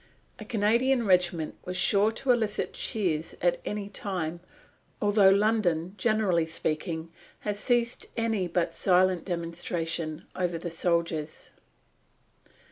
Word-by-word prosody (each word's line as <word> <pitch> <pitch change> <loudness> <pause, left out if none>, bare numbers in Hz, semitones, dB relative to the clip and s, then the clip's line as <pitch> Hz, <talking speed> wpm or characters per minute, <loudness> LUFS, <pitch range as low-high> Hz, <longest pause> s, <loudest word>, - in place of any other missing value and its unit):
A 215 - -8
Canadian 235 +4 +2
regiment 180 -4 +2
was 180 0 -4
sure 200 +3 +3
to 255 +3 0
elicit 220 -4 0
cheers 170 -8 -1
at - - +1
any 210 -1 -3
time, 180 -5 -4 0.6
although 205 -1 +5
London, 195 -4 +2
generally 200 -6 +1
speaking, 160 +1 -2 0.3
has 205 -1 -3
ceased 240 0 0
any 225 -5 0
but 175 0 -1
silent 185 -1 +2
demonstration 165 -2 -3
over 180 -2 -1
the 170 +1 -5
soldiers. 170 -2 -1
185 Hz, 115 wpm, -28 LUFS, 170-215 Hz, 0.6 s, although